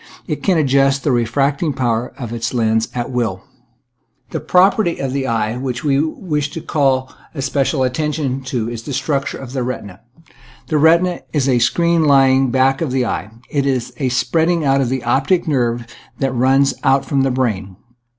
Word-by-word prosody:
It -, -, -4 dB
can 185 Hz, -4 st, +2 dB
adjust 135 Hz, -2 st, +2 dB
the 145 Hz, -, +1 dB
refracting 140 Hz, +6 st, 0 dB
power 120 Hz, -2 st, -1 dB
of 120 Hz, -5 st, -6 dB
its 120 Hz, +2 st, -3 dB
lens 110 Hz, -1 st, +1 dB
at 120 Hz, +1 st, -3 dB
wilL 115 Hz, -7 st, -2 dB, 0.9 s
The -, -, -2 dB
property 185 Hz, 0 st, +3 dB
of 135 Hz, -1 st, -3 dB
the 135 Hz, -1 st, -1 dB
eye 110 Hz, -2 st, 0 dB
that 125 Hz, -1 st, -4 dB
we 140 Hz, -2 st, +2 dB
wish 150 Hz, -2 st, -2 dB
to 165 Hz, -, -5 dB
call 135 Hz, -4 st, 0 dB, 0.2 s
especial 135 Hz, 0 st, 0 dB
attention 140 Hz, 0 st, -1 dB
to 125 Hz, -4 st, -2 dB
is 115 Hz, -1 st, -5 dB
the 140 Hz, -, -6 dB
structure 140 Hz, +1 st, -1 dB
of 130 Hz, -1 st, -9 dB
the 130 Hz, -, -2 dB
retina. 105 Hz, -7 st, -5 dB, 0.7 s
The 155 Hz, -, +2 dB
retina 170 Hz, +3 st, +3 dB
is 145 Hz, -4 st, +1 dB
the 130 Hz, -3 st, +2 dB
screen 170 Hz, +6 st, +2 dB
lying 135 Hz, -2 st, +4 dB
back 135 Hz, +3 st, +2 dB
of 160 Hz, -, -1 dB
the 130 Hz, -1 st, +1 dB
eye, 105 Hz, -3 st, -3 dB, 0.2 s
and 140 Hz, -2 st, +1 dB
is 125 Hz, -2 st, -1 dB
a 135 Hz, -3 st, 0 dB
spreading 160 Hz, +6 st, +1 dB
out 135 Hz, 0 st, +3 dB
of 125 Hz, -, 0 dB
the 130 Hz, -1 st, -2 dB
optic 135 Hz, +9 st, +1 dB
nerve 120 Hz, -5 st, 0 dB, 0.3 s
that 135 Hz, -1 st, -1 dB
runs 135 Hz, +2 st, +3 dB
out 135 Hz, 0 st, +3 dB
from 140 Hz, -1 st, 0 dB
the 135 Hz, -, +2 dB
brain. 105 Hz, -7 st, -2 dB
135 Hz, 180 wpm, -18 LUFS, 120-145 Hz, 0.9 s, lying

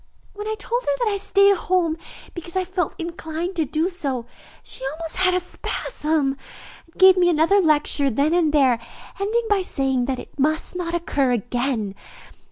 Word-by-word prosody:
"When 415 Hz, +1 st, -6 dB
I 435 Hz, -, -1 dB
told 475 Hz, +4 st, -2 dB
her -, -, -3 dB
that 475 Hz, -4 st, 0 dB
I -, -, 0 dB
stayed 400 Hz, 0 st, +4 dB
at 395 Hz, -, +2 dB
home 345 Hz, -3 st, +1 dB, 0.4 s
because 345 Hz, 0 st, -8 dB
I 375 Hz, -1 st, +1 dB
felt 360 Hz, -3 st, -2 dB
inclined 335 Hz, +1 st, -5 dB
to 320 Hz, -, +2 dB
do 310 Hz, +5 st, 0 dB
so, 280 Hz, -10 st, -3 dB, 0.4 s
she -, -, -4 dB
almost 325 Hz, 0 st, -5 dB
had 370 Hz, 0 st, +3 dB
a -, -, +3 dB
spasm, 305 Hz, -, -2 dB, 0.5 s
and 330 Hz, -, -25 dB
gave 375 Hz, 0 st, +7 dB
me 355 Hz, -1 st, +4 dB
another 340 Hz, +5 st, +4 dB
lecture 295 Hz, -3 st, +3 dB
then 280 Hz, +6 st, +1 dB
and 340 Hz, -3 st, +3 dB
there, 265 Hz, -6 st, +3 dB, 0.4 s
ending 435 Hz, +4 st, 0 dB
up 450 Hz, -, -7 dB
by 410 Hz, -2 st, +3 dB
saying 270 Hz, -7 st, 0 dB
that 260 Hz, 0 st, -2 dB
it -, -, -12 dB
must 310 Hz, +5 st, 0 dB
not 345 Hz, -1 st, -2 dB
occur 280 Hz, -6 st, 0 dB
again. 240 Hz, -2 st, -1 dB
335 Hz, 185 wpm, -22 LUFS, 280-370 Hz, 0.5 s, gave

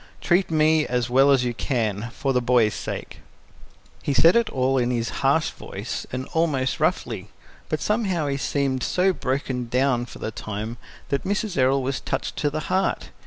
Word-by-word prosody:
Treat 180 Hz, +2 st, +2 dB
me 155 Hz, -1 st, +3 dB
as 125 Hz, -1 st, -1 dB
well 135 Hz, +2 st, +5 dB
as 135 Hz, -3 st, +4 dB
you 120 Hz, -, -1 dB
can, 115 Hz, -3 st, -1 dB
for 135 Hz, +1 st, -1 dB
the 125 Hz, -, +2 dB
boy's 120 Hz, -3 st, +3 dB
sake." -, -, -6 dB, 0.8 s
He 140 Hz, -, -1 dB
said 165 Hz, -, +6 dB
it 235 Hz, -2 st, +3 dB
all 130 Hz, -2 st, +1 dB
in 120 Hz, 0 st, +1 dB
his 115 Hz, -2 st, -1 dB
harsh 140 Hz, +4 st, +2 dB
voice, -, -, -6 dB
and 130 Hz, +1 st, -3 dB
almost 145 Hz, -6 st, +1 dB
roughly, -, -, -1 dB, 0.4 s
but 155 Hz, -, -1 dB
somehow 195 Hz, -7 st, 0 dB
he 140 Hz, -1 st, -1 dB
seemed 135 Hz, -2 st, -1 dB
so 185 Hz, +6 st, +2 dB
broken 130 Hz, -4 st, -2 dB
down 125 Hz, 0 st, +1 dB
for -, -, -11 dB
the 110 Hz, -, -4 dB
time 110 Hz, +2 st, -5 dB, 0.3 s
that 140 Hz, -, 0 dB
Mrs. 205 Hz, 0 st, -1 dB
Errol 135 Hz, 0 st, +3 dB
was 135 Hz, +1 st, -1 dB
touched -, -, -3 dB
to 145 Hz, -, +1 dB
the 155 Hz, +2 st, -3 dB
heart. 185 Hz, -, -1 dB
135 Hz, 180 wpm, -24 LUFS, 125-155 Hz, 0.8 s, said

